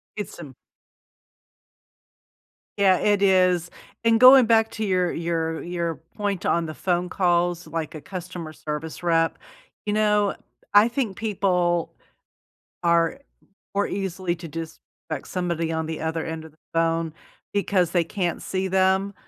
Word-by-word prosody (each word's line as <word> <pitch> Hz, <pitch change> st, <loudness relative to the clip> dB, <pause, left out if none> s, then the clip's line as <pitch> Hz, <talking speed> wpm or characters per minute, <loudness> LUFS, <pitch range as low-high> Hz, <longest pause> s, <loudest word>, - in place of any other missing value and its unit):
It's 210 Hz, -4 st, -6 dB
m 145 Hz, -6 st, -10 dB, 2.2 s
Yeah, 195 Hz, -2 st, +5 dB
it 205 Hz, -1 st, +2 dB
is. 185 Hz, -3 st, +3 dB, 0.3 s
And 230 Hz, -1 st, +4 dB
going 255 Hz, +1 st, +9 dB
back 225 Hz, -1 st, +3 dB
to 220 Hz, -, -3 dB
your 185 Hz, -3 st, +1 dB
your 165 Hz, -1 st, -2 dB
your 170 Hz, -1 st, -2 dB, 0.2 s
point 205 Hz, -3 st, -2 dB
on 170 Hz, 0 st, +2 dB
the 155 Hz, -, -5 dB
phone 180 Hz, +1 st, -1 dB
calls, 175 Hz, -1 st, +1 dB
like 165 Hz, -2 st, -4 dB
a 155 Hz, -, -8 dB
customer 180 Hz, -3 st, -7 dB
service 155 Hz, +2 st, -6 dB
rep, 165 Hz, -1 st, +2 dB, 0.5 s
you 205 Hz, -, 0 dB
know, 210 Hz, -1 st, +2 dB, 0.4 s
I 205 Hz, +2 st, +7 dB
think 235 Hz, -5 st, -2 dB
people 180 Hz, -6 st, 0 dB, 0.9 s
are 170 Hz, +9 st, +2 dB, 0.5 s
more 200 Hz, 0 st, +1 dB
easily 185 Hz, -2 st, -2 dB
to 170 Hz, 0 st, -9 dB
dis 165 Hz, +1 st, -6 dB, 0.3 s
spect 155 Hz, -4 st, -4 dB
somebody 170 Hz, -3 st, -2 dB
on 160 Hz, 0 st, -2 dB
the 160 Hz, 0 st, -5 dB
other 160 Hz, 0 st, -2 dB
end 160 Hz, 0 st, -5 dB
of 160 Hz, -, -13 dB
the 155 Hz, -, -31 dB, 0.2 s
phone 165 Hz, -1 st, +1 dB, 0.4 s
because 195 Hz, -4 st, +1 dB
they 175 Hz, -2 st, +2 dB
can't 175 Hz, -1 st, -2 dB
see 190 Hz, 0 st, -2 dB
them, 190 Hz, +1 st, +2 dB
180 Hz, 145 wpm, -24 LUFS, 165-200 Hz, 2.2 s, going